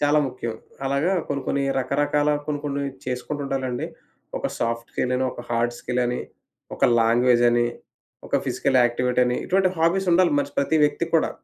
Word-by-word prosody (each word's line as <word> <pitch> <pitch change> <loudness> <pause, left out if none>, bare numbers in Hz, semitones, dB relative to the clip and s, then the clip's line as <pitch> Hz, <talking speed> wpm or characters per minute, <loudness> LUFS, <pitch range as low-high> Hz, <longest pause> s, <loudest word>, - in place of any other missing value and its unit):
చాలా 145 +1 +4
ముఖ్యం. 120 -3 -5 0.3
అలాగా 140 +7 +1 0.2
కొన్ని 140 -1 -2
కొన్ని 140 - 0 0.2
రకరకాల 145 +3 +1 0.2
కొన్ని 150 -1 -1
కొన్ని 140 -1 -2 0.2
చేసుకుంటు 130 +3 -3
ఉండాలండి. 130 -2 -2 0.5
ఒక - - -2
సాఫ్ట్ 115 0 -2
స్కిల్ 125 0 -1
అని, 130 - 0
ఒక - - -8
హార్డ్ 120 0 0
స్కిల్ 125 0 -2
అని, 120 0 -2 0.5
ఒక - - +1 0.2
లాంగ్వేజ్ 120 +1 +4
అని. 120 0 +2 0.6
ఒక - - +1
ఫిజికల్ 130 - +1
యాక్టివిటీ 125 +1 +1
అని, 125 - 0
ఇటువంటి 190 0 +2
హాబీస్ 170 +4 +2
ఉండాలి. 180 0 +4
మనిషి 145 0 -2
ప్రతి 150 +3 +2
వ్యక్తికి 165 +3 +1
కూడా. 160 - +2
135 Hz, 170 wpm, -24 LUFS, 125-145 Hz, 0.6 s, చాలా